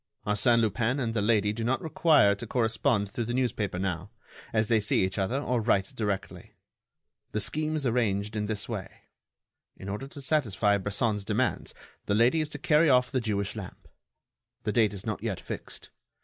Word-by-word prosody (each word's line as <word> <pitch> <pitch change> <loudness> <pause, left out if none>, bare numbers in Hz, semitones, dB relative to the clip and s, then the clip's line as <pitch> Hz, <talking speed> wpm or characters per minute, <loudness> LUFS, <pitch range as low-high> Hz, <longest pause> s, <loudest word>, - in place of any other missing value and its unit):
Arsène 115 +3 +3
Lupin 115 +4 0
and 115 -4 -1
the 110 - 0
lady 105 -1 +2
do 115 +1 -4
not 125 +3 +1
require 155 - +4
to 105 +4 -7
correspond 110 -2 +1
through 115 +2 -3
the 120 +2 -3
newspaper 105 -7 -1
now, 90 0 -3 0.4
as 110 -1 +1
they 115 -1 +3
see 105 -2 +2
each 95 +2 -3
other 115 +8 0
or 125 -4 0
write 100 -3 +1
directly. 100 -3 -4 0.8
The 105 - 0
scheme 155 +8 -1
is 150 -3 -2
arranged 105 -4 0
in 105 -1 -1
this 105 -2 -2
way: 105 -6 -4 0.9
in 95 - -9
order 105 +7 -4
to 140 - -10
satisfy 110 -8 +1
Bresson's 105 +1 -1
demands, 110 +5 -1 0.3
the 100 - +2
lady 120 +8 +4
is 155 - -3
to 150 - -6
carry 150 +2 +3
off 125 -1 +4
the 130 -3 0
Jewish 100 -2 -2
lamp. 100 -4 -9 0.8
The 105 - -1
date 105 -1 +2
is 95 - -8
not 110 -3 -3
yet 110 -5 -3
fixed. - - -8
110 Hz, 185 wpm, -28 LUFS, 100-125 Hz, 0.9 s, require